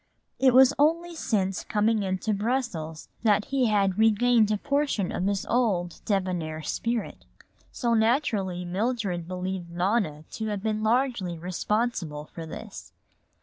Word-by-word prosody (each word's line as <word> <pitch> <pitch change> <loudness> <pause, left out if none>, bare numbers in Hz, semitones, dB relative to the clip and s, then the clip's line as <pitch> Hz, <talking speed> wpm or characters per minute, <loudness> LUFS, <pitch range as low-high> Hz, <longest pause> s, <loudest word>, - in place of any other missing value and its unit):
It 260 -2 +5
was 265 +1 +7
only 335 +4 +2
since 200 - -1
coming 215 +1 +1
into 190 +2 -1
Brussels 200 -8 -2
that 210 -2 +3
he 270 -3 +1
had 200 -2 +1
regained 225 0 +4
a 210 - +1
portion 280 -6 0
of 185 - -1
his 200 -1 -1
old 200 -8 0
debonair 180 -6 -1
spirit. 230 +4 -3 0.5
So 235 -2 0
naturally 220 -6 +1
Mildred 195 -2 -2
believed 185 -1 -4
Nona 175 -3 0
to 220 - -4
have 205 -2 -3
been 215 -1 -1
largely 220 -6 0
responsible 180 -3 -2
for 165 -1 -7
this. - - -9
210 Hz, 135 wpm, -26 LUFS, 180-235 Hz, 0.5 s, was